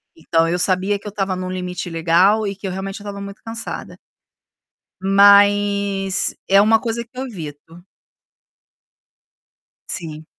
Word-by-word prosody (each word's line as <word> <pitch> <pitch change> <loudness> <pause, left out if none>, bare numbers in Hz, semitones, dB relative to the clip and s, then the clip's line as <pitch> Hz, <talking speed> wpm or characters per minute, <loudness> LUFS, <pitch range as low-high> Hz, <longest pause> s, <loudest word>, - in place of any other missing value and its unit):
Então, 165 0 +1
eu 175 +2 -1
sabia 190 +2 +1
que 210 - -11
eu - - -3
estava 195 -2 -2
em 185 - -5
um 185 - -4
limite 180 -1 -5
legal 175 +6 +3
e 195 - -4
que 195 - -7
eu 185 - -3
realmente 195 +2 -5
eu - - -11
estava 200 -1 -7
muito 200 0 -9
cansada. 225 -1 -7 1.0
Mas 200 0 +4
é 195 +1 +6
uma 220 +2 +4
coisa 235 0 -3
que 245 +2 -22
eu 265 - -3
evito. 165 - -10 2.0
Sim. 160 -3 -6
195 Hz, 150 wpm, -20 LUFS, 180-205 Hz, 2.0 s, é